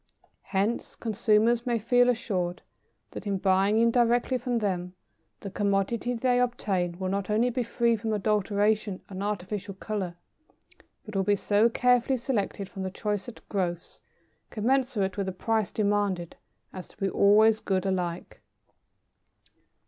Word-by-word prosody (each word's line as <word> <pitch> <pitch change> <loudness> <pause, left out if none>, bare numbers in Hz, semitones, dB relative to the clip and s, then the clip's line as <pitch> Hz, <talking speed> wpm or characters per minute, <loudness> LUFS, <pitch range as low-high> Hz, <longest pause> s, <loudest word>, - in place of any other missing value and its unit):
Hence, 205 +4 -1
consumers 225 +2 +2
may 240 -1 +2
feel 245 +3 +3
assured 185 -7 -2 0.5
that - - -7
in 200 -1 0
buying 195 +2 +2
indirectly 240 +2 +3
from 245 0 -1
them, 185 -4 -2 0.5
the 200 - -6
commodity 205 +5 0
they 245 +1 +2
obtain 190 -8 -1
will 185 0 -3
not 195 0 -2
only 230 +4 +2
be 250 +1 -1
free 235 0 +1
from 220 0 -3
adulteration 210 -1 0
and 190 -1 -6
artificial 200 0 -4
colour, 195 -3 -4 0.9
but 215 -2 -9
will 195 - +2
be 205 +2 +2
so 205 +3 +3
carefully 250 +2 +2
selected 215 -5 -2
from 195 - -8
the 190 - -2
choicest 210 +4 -5
growths, 175 -4 -3 0.5
commensurate 230 -4 0
with 200 -1 -1
the - - -1
price 220 +2 -1
demanded, 205 -5 0 0.4
as 185 -1 -8
to - - -20
be 195 - -1
"always 215 +3 +5
good 190 -2 -1
alike." 180 -2 -3
210 Hz, 140 wpm, -27 LUFS, 190-230 Hz, 0.9 s, always